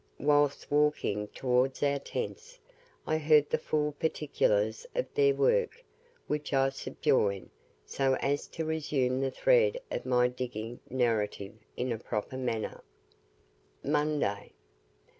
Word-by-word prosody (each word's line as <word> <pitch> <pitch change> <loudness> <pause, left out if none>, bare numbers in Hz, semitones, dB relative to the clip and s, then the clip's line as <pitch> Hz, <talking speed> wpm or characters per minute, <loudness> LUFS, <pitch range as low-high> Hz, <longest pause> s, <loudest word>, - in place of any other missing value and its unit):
Whilst 145 0 +2
walking 145 -8 +1
towards 130 +4 0
our 140 0 +2
tents, 470 - -6 0.5
I 155 0 0
heard 150 -1 +4
the - - +2
full 150 -1 0
particulars 485 - 0
of - - +1
their 425 -1 +4
work, 475 +1 +1 0.4
which 150 0 -3
I 135 0 +4
subjoin, 130 -8 0 0.3
so 135 - +1
as 140 +2 -1
to 160 - -5
resume 140 -5 0
the 135 - +1
thread 485 - +3
of - - -4
my 125 -1 +4
DIGGING 120 -2 -5
narrative 110 -5 0 0.2
in 125 0 -1
a 115 - -2
proper 105 +2 -4
manner. 120 -4 -3 1.0
MONDAY. 145 -8 0
140 Hz, 120 wpm, -30 LUFS, 125-155 Hz, 1.0 s, heard